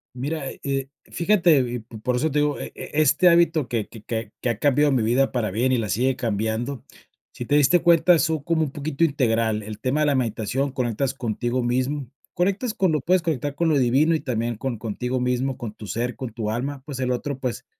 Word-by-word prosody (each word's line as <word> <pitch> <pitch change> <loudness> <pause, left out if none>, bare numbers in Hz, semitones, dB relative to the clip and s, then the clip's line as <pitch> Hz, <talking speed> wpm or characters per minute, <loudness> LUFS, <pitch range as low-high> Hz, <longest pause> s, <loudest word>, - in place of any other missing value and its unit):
Mira, 140 +2 -3
eh, 135 -1 -2 0.2
fíjate, 170 -5 +3
y 125 -1 -2
p 115 0 -12
por 125 +2 -1
eso 155 +6 +1
te 150 - +1
digo, 145 -1 0
e - - -7
e - - -8
este 155 +5 +5
hábito 170 -5 +3
que 115 -3 -1
que 110 -2 -13
que 110 -2 -4
que 125 - 0
ha 115 -1 -2
cambiado 145 +1 +3
mi 130 -4 +2
vida 125 +5 +2
para 115 -5 -1
bien, 120 +6 +1
y 125 - +3
la 110 -3 -1
sigue 125 +6 0
cambiando, 110 +3 -2 0.5
si 120 - -6
te 145 - +1
diste 150 +4 +4
cuenta, 170 0 +5
son 160 -3 0
como 165 0 +1
un 145 - -3
poquito 145 +2 0
integral 115 -7 +1
el 105 0 -8
tema 135 +4 0
de 150 - +3
la 145 - +2
meditación, 130 +3 -1
conectas 125 +1 -1
contigo 120 0 -2
mismo, 130 +3 -1 0.3
conectas 200 +6 0
con 185 -3 +1
lo 155 - +1
puedes 180 +6 +2
conectar 145 -3 -2
con 165 +2 +1
lo 150 - +3
divino 135 +6 +3
y 160 - +1
también 115 -3 -2
con 130 -2 -3
contigo 125 +4 -3
mismo, 125 +1 0
con 115 -5 -6
tu 105 - -10
ser, 120 +3 -3
con 125 -4 -6
tu 110 -2 -3
alma, 135 +4 -4
pues, 140 -4 -6
el 125 -1 0
otro, 135 +2 -3
pues, 125 -3 -4
130 Hz, 225 wpm, -23 LUFS, 120-150 Hz, 0.5 s, este